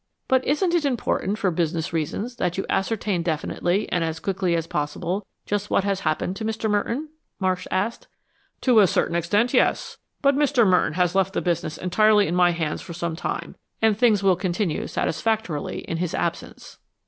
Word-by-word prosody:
"But 260 -1 +3
isn't 340 +5 +1
it 340 -3 +2
important, 235 -6 0
for 195 -4 +1
business 165 0 -1
reasons, 200 - -3
that 180 0 -1
you 195 - -1
ascertain 195 -2 0
definitely, 175 +4 -1
and 175 - +1
as 165 0 -3
quickly 185 -2 0
as 165 -1 -1
possible, 170 +6 -3 0.2
just 205 0 -2
what - - +2
has 200 -1 0
happened 155 +2 -1
to 225 - -5
Mr. 220 0 -2
Merton?" 230 +8 -1 0.3
Marsh 185 -1 -1
asked. 205 +5 -2 0.5
"To 245 -4 +5
a 200 - +6
certain 170 - 0
extent, 205 +8 +1
yes. - - +1 0.2
But 280 0 +5
Mr. 280 -5 +3
Merton 180 -4 +3
has 180 0 +1
left 195 0 +1
the - - 0
business 170 -3 -1
entirely 210 +3 +4
in 170 - -2
my 180 -1 +5
hands 165 -3 -2
for 170 - -8
some 170 -1 -3
time, - - -4 0.2
and 220 -1 +3
things 215 -3 +3
will 190 -2 +5
continue 180 -1 -1
satisfactorily 215 -5 -2
in 165 - -4
his 175 0 -2
absence." - - -4
190 Hz, 185 wpm, -24 LUFS, 170-220 Hz, 0.5 s, a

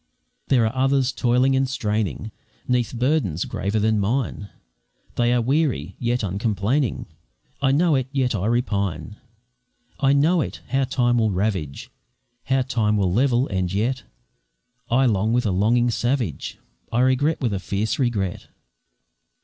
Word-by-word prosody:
There 125 -4 +3
are 110 - -1
others 135 0 +2
toiling 125 +2 +2
and 135 0 +1
straining 110 -3 -2 0.4
'Neath 125 -2 +1
burdens 125 - 0
graver 100 +3 -2
than 110 0 +2
mine 105 -1 -2 0.6
They 120 0 +1
are 120 -1 +2
weary, 130 - 0
yet 120 0 0
uncomplaining 105 +6 -1 0.6
I 135 -1 +3
know 160 +4 +3
it, 130 -2 +1
yet 130 -3 0
I 100 -1 -1
repine; 105 - -1 0.8
I 135 -1 +3
know 160 +5 +3
it, - - -5
how 135 +2 +1
time 120 -2 +1
will 110 -1 +2
ravage, 95 -7 -2 0.5
How 135 0 +1
time 110 -5 0
will 95 -3 +1
level, 125 +3 +2
and 95 -2 -1
yet 120 +6 -1 0.9
I 130 +3 +3
long 110 -1 +1
with 125 0 +1
a 105 - +1
longing 120 +6 +2
savage, 120 - -2 0.3
I 120 - +2
regret 130 +5 +2
with 120 -5 -1
a 95 - -1
fierce 100 +6 -2
regret. 105 -8 -1
120 Hz, 145 wpm, -23 LUFS, 105-130 Hz, 0.9 s, There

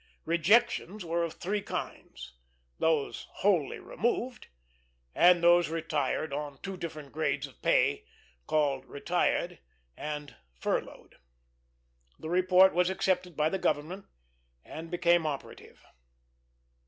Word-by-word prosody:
Rejections 200 +3 +2
were 170 +1 0
of 165 - -3
three 205 +3 -2
kinds: 65 - -7 0.5
those 160 -3 0
wholly 185 -8 +1
removed, 240 +2 -2 0.7
and 175 -1 +5
those 175 -1 +5
retired 155 -3 -2
on 145 -1 -4
two 195 -1 -4
different 155 -5 -7
grades 145 -2 -1
of 135 - -16
pay, - - +2 0.4
called 140 -4 +1
"Retired," 175 +3 -1 0.4
and 150 -2 -6 0.2
"Furloughed." 60 - -4 1.0
The 160 - -7
report 185 +1 +5
was 180 +1 +2
accepted 180 -2 -1
by 155 +1 +2
the 190 - -2
government 165 +5 -2 0.6
and 165 +1 -8
became 175 -2 +2
operative. 140 -3 -7
170 Hz, 110 wpm, -30 LUFS, 150-180 Hz, 1.0 s, and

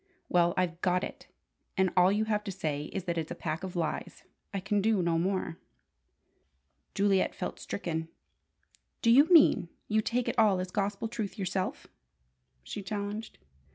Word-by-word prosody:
"Well, 175 -1 +3
I've 175 -1 0
got 180 0 +2
it, - - -7 0.5
and 190 -1 +3
all 180 +1 +6
you 210 +2 +1
have 210 -1 0
to 200 - -3
say 155 -6 -3
is 195 +3 -5
that 170 -2 -1
it's 160 - -4
a 175 - -4
pack 165 +1 -4
of 185 -1 -5
lies. 165 -3 -3 0.3
I 200 - -2
can 205 +2 0
do 215 0 +2
no 165 -1 +2
more." 185 -2 -1 1.4
Juliet 195 -1 +2
felt - - -5
stricken. 160 -4 -3 1.0
"Do 230 - +5
you 275 +5 +8
mean 310 - +6 0.2
you 215 0 +2
take 240 +3 -1
it - - 0
all 205 -4 +5
as 185 0 -4
gospel 200 +2 -1
truth 220 -2 -4
yourself?" 185 -1 -2 0.8
she 205 - -6
challenged. 205 +2 -5
190 Hz, 165 wpm, -30 LUFS, 175-210 Hz, 1.4 s, you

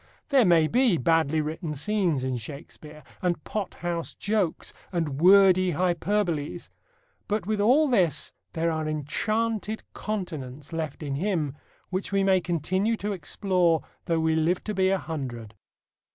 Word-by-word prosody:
There 270 -5 +5
may 170 -3 +5
be 235 +1 +3
badly 160 +2 +2
written 155 +1 -4
scenes 175 -4 +1
in 130 -1 -1
Shakespeare, 150 +5 -9 0.2
and 175 -3 -1
pot 210 -3 -4
house 170 -1 -3
jokes, 205 -5 -1 0.2
and 160 -5 -2
wordy 185 -1 +6
hyperboles, 175 -1 -1 0.6
but 210 -3 -1
with 215 0 -1
all 270 +9 +5
this 180 - +1 0.2
there 165 +1 0
are 155 -1 -2
enchanted 215 +9 -1
continents 155 -9 -5
left 160 -2 -4
in 140 -2 -3
him 155 -3 -1 0.4
which 185 +2 -2
we 195 0 +2
may 190 -1 +4
continue 185 +7 0
to 210 0 -3
explore 175 -1 +1 0.2
though 165 -1 +1
we 160 0 +2
live 165 +3 +1
to 215 - -3
be 190 -1 +2
a 195 - +2
hundred. 125 - -6
175 Hz, 145 wpm, -26 LUFS, 155-200 Hz, 0.6 s, wordy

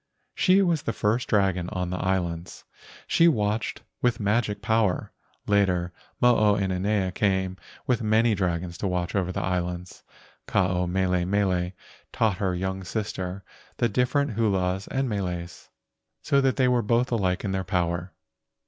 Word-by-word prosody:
She 195 +1 +4
was 170 -5 +1
the 115 - -2
first 110 +4 0
dragon 95 -4 +1
on 90 -1 -3
the 90 - -3
islands. 90 -2 -2 0.4
She 165 - +4
watched 105 -5 0 0.2
with 120 -3 +1
magic 105 0 0
power. 110 -4 +1 0.3
Later, 90 -4 +1 0.3
Mo 120 -1 +5
o 105 -1 +4
inanea 95 0 0
came 95 -2 0 0.3
with 125 -3 +1
many 110 +1 +3
dragons 90 -3 -2
to 100 - -1
watch 90 -1 -2
over 90 -2 0
the - - -3
islands. 90 -1 -3 0.5
Ke - - -10
ao 90 -2 +2
mele 90 0 +1
mele 90 -1 0 0.4
taught 110 -5 +1
her 95 -2 0
young 95 +1 -3
sister 95 -1 -4 0.3
the 120 - +2
different 130 +5 +1
hulas 95 -3 0
and 135 0 -1
meles, 90 -5 -4 0.5
so 140 - +3
that 135 -1 +2
they 130 -2 +3
were 125 -1 +3
both 115 +3 +1
alike 95 -5 0
in 100 - -2
their 95 0 -1
power. 90 -1 -1
95 Hz, 155 wpm, -26 LUFS, 90-110 Hz, 0.5 s, Mo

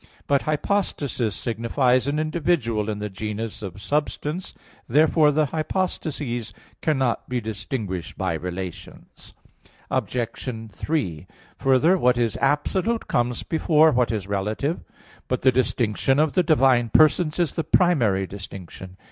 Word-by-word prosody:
But 140 -1 +2
"hypostasis" 145 - -1
signifies 125 +3 +1
an 145 +1 0
individual 155 -9 0
in 105 - -2
the 105 0 -3
genus 105 +2 -5
of 95 -2 -7
substance. 150 - -2 0.3
Therefore 155 +3 +4
the 155 +1 +2
hypostases 150 - -3 0.3
cannot 135 -6 0
be 125 0 0
distinguished 105 - -5
by 95 -3 -1
relations. 90 +2 -7 0.6
Obj. - - -1 0.6
3: 95 - -2 0.3
Further, 140 +8 +4
what 125 -3 +3
is 115 -3 +1
absolute 190 +10 0
comes 120 0 0
before 160 -1 +3
what 125 -3 +2
is 105 -4 -2
relative. 105 - -2 0.5
But 130 - -2
the 130 - +6
distinction 125 0 +1
of 155 0 +2
the 185 - +4
divine 135 -7 +3
persons 155 +4 +4
is 170 -5 +1
the 165 - -2
primary 120 - +2
distinction. 95 -1 -9
125 Hz, 125 wpm, -24 LUFS, 105-155 Hz, 0.6 s, the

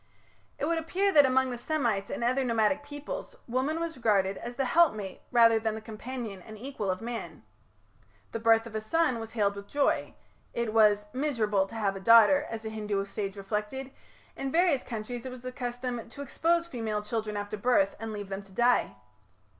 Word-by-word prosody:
It - - -1
would 330 +1 +1
appear 380 +5 +1
that 290 -6 +7
among 260 0 +2
the 245 - -5
Semites 235 -9 0
and - - -3
other 255 +3 +2
nomadic 230 +3 +2
peoples 290 - -7
woman 260 +6 0
was 335 -1 -3
regarded 200 -5 +2
as 240 +1 -6
the 270 - 0
helpmate 215 - +2
rather 230 -2 +6
than 220 -1 -1
the - - -5
companion 220 -2 -6
and 215 +3 -11
equal 245 -4 -4
of 185 0 -1
man. 235 0 -6 0.9
The 230 - -3
birth 225 0 +4
of 230 - -9
a 215 - -2
son 255 +1 +1
was 225 0 -7
hailed 200 -3 +1
with 200 0 -8
joy; 285 +5 0 0.4
it 235 -2 -1
was 210 -2 +5
"miserable 225 -8 +1
to 230 - -11
have 200 -3 0
a - - -5
daughter", 230 +8 +6
as 225 -1 -6
a - - -2
Hindu 210 -2 -2
sage 200 0 -4
reflected; 210 +7 -4 0.4
in 270 0 -3
various 330 -5 +3
countries 235 +1 -5
it - - -6
was 255 -1 -9
the 255 0 -5
custom 245 -1 -4
to 285 - -7
expose 335 +4 +1
female 225 -9 -3
children 215 -1 -3
after 205 +1 -4
birth 200 -3 +2
and 225 0 -5
leave 205 -2 -6
them 195 0 -4
to 195 -1 -17
die. 240 +5 +2
230 Hz, 195 wpm, -29 LUFS, 210-265 Hz, 0.9 s, that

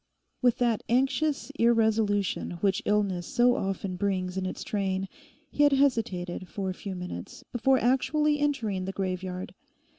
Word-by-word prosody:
With 245 -2 +3
that 235 -3 +1
anxious 270 +4 +1
irresolution 220 -5 +2
which 195 -2 +2
illness 200 -4 +1
so 245 +1 +3
often 190 -1 -3
brings 185 -2 -1
in 190 -1 -1
its - - -5
train 195 -2 -1 0.4
he - - -1
had 290 -1 +6
hesitated 200 -10 0
for 195 -2 -3
a - - -4
few 190 +1 -6
minutes 180 - -7
before 265 +2 +3
actually 295 +5 +2
entering 225 -10 0
the 195 - -4
graveyard. 185 -1 -4
205 Hz, 145 wpm, -28 LUFS, 185-250 Hz, 0.4 s, had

